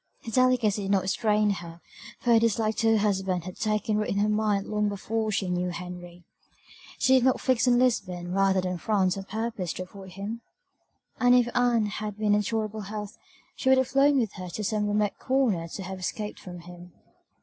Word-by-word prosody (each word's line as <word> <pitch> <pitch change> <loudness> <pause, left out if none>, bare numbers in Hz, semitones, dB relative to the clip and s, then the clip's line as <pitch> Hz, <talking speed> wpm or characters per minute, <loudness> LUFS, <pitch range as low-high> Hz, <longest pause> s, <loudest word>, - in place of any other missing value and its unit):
Her 225 - -5
delicacy 250 -5 +2
did 195 - -4
not 195 -2 +2
restrain 210 +1 +1
her, 170 -3 -6 0.4
for 245 - +1
her 225 - +6
dislike 220 -1 +1
to 225 0 +3
her - - +4
husband 190 -4 0
had 185 +1 -8
taken 215 0 0
root 210 - -1
in 200 - -1
her 205 +1 +2
mind 210 -2 +1
long 210 -1 0
before 215 +2 -2
she 195 -2 -1
knew 180 0 -1
Henry. 175 0 -8 0.7
Did - - -7
she 260 -1 +5
not 260 +1 +2
fix 255 -1 +1
on 245 -1 +5
Lisbon 185 -8 0
rather 195 0 +2
than 180 -1 -3
France 195 -3 +1
on 195 -1 -6
purpose 220 -4 -3
to 185 - -5
avoid 190 0 -12
him? 205 +5 -6 0.8
and 245 0 +5
if 240 -1 +2
Ann 240 -3 +3
had 210 0 -5
been 210 -1 +2
in 210 - +3
tolerable 215 +1 -2
health 210 0 -6 0.4
she 260 - 0
would 265 - +6
have 260 -1 +1
flown 275 +2 +4
with 230 -6 0
her 185 -1 -6
to 210 +5 -5
some 210 0 0
remote 205 0 0
corner 245 -11 +1
to 190 +3 -7
have 190 +1 -6
escaped 210 +3 -4
from 175 -2 -9
him. 175 0 -13
210 Hz, 205 wpm, -27 LUFS, 185-225 Hz, 0.8 s, her